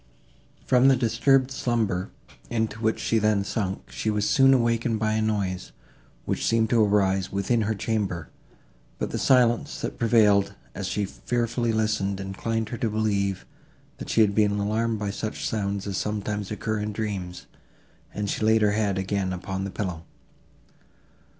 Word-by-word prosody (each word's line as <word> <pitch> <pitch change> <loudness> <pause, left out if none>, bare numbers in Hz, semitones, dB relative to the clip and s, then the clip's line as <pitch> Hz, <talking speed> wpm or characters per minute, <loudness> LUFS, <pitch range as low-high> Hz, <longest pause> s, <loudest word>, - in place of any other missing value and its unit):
From 125 +1 +4
the 135 - +6
disturbed 125 +3 +2
slumber, 110 -8 -1 0.4
into 110 -1 -2
which 110 0 +1
she 115 - +1
then 105 -2 +2
sunk, 100 -2 -3
she 110 - -2
was 105 -1 0
soon 135 -2 +5
awakened 115 -2 +2
by 110 0 0
a 110 - +1
noise, 100 -4 -2 0.5
which - - -2
seemed 115 -1 +2
to 115 -2 +5
arise 95 -2 +2
within 100 +4 +1
her 110 +1 0
chamber; 100 -7 -2 0.7
but - - -3
the - - -2
silence, 120 -3 +3
that - - -4
prevailed, 105 -4 +4 0.2
as 95 -1 -4
she 100 +2 -1
fearfully 120 +3 -1
listened, 105 -3 0
inclined 110 +3 -3
her 120 - -4
to 115 - 0
believe, 100 -3 -1 0.5
that - - -7
she 115 - +3
had 105 -2 +4
been 105 -1 +3
alarmed 110 +2 0
by 105 -1 -2
such 110 +2 -4
sounds 100 -2 -2
as 100 -2 -3
sometimes 105 -1 -3
occur 110 0 -2
in 105 0 -3
dreams, 100 -5 -4 0.7
and 105 0 -3
she 105 - -2
laid 110 0 +4
her 105 - +4
head 105 -2 0
again 95 0 -1
upon 95 +1 -4
the - - -4
pillow. 90 -4 -4
105 Hz, 165 wpm, -25 LUFS, 100-115 Hz, 0.7 s, the